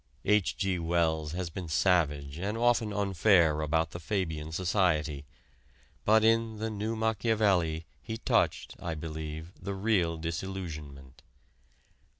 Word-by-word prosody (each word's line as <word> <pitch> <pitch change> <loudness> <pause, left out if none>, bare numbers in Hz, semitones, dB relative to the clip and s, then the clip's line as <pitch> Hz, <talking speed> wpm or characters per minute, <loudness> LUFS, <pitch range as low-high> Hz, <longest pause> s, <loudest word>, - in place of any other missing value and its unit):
H. 105 -2 +2
G. 95 -3 0
Wells 80 -2 0
has 90 -1 -3
been 90 0 -6
savage 75 -4 +1
and 100 +4 -2
often 120 -2 +2
unfair 95 -5 +3
about 80 +1 0
the 85 - -6
Fabian 80 -5 -2
Society, 80 -5 0 0.8
but 110 +1 +5
in 115 0 +2
"The 110 +1 -3
New 110 +2 -2
Machiavelli" 105 -7 +1 0.2
he 110 -1 -5
touched, - - 0
I 85 -2 -4
believe, 80 +1 -6
the 100 - -4
real 95 -5 +1
disillusionment. 80 -6 -6
90 Hz, 125 wpm, -30 LUFS, 80-105 Hz, 0.8 s, but